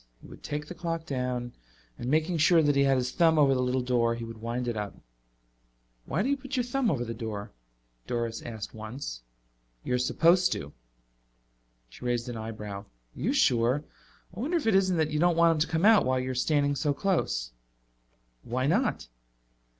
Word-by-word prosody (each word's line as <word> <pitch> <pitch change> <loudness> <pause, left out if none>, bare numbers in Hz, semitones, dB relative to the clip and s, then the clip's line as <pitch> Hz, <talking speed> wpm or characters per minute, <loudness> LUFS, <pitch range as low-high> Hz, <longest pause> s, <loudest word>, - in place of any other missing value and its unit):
He - - -17
would - - -13
take 150 0 -4
the 165 - -8
clock 165 -2 -4
down 125 -3 -3 0.5
and 120 - -3
making 160 +3 +1
sure 160 +1 +5
that 145 -1 +3
he 140 - +4
had 135 -1 +3
his 125 0 -1
thumb 165 0 +3
over 140 -3 +5
the 130 - +1
little 125 0 0
door, 120 -2 +1
he 115 - -6
would 115 -1 -8
wind 120 +2 -3
it 120 - -1
up. 105 -1 -4 1.1
"Why 165 +8 -1
do 265 - 0
you 280 - +2
put 270 0 -6
your 250 - +2
thumb 245 0 0
over 120 -6 -1
the 115 - -4
door?" 110 -2 -5 0.6
Doris 115 -1 -2
asked 110 -3 -7
once. 110 - -7 0.6
"You're 125 0 0
supposed 175 +7 +3
to." 70 +1 -6 1.1
She - - -14
raised 120 -1 -1
an 120 - -5
eyebrow. 110 -3 -6
"Are 100 - -14 0.3
you 195 - -1
sure? 130 - +2 0.5
I - - -8
wonder 310 +9 0
if 320 - -3
it 225 - +3
isn't 190 -2 +3
that 155 -1 +1
you 150 - 0
don't 175 0 +3
want 170 0 +6
him 160 - 0
to 155 - +2
come 165 +3 +1
out 220 -1 +7
while 130 0 +1
you're 130 0 -2
standing 145 +2 +1
so 145 +1 0
close." - - 0 0.9
"Why 130 +2 -2
not?" 185 - +1
135 Hz, 195 wpm, -28 LUFS, 120-170 Hz, 1.1 s, out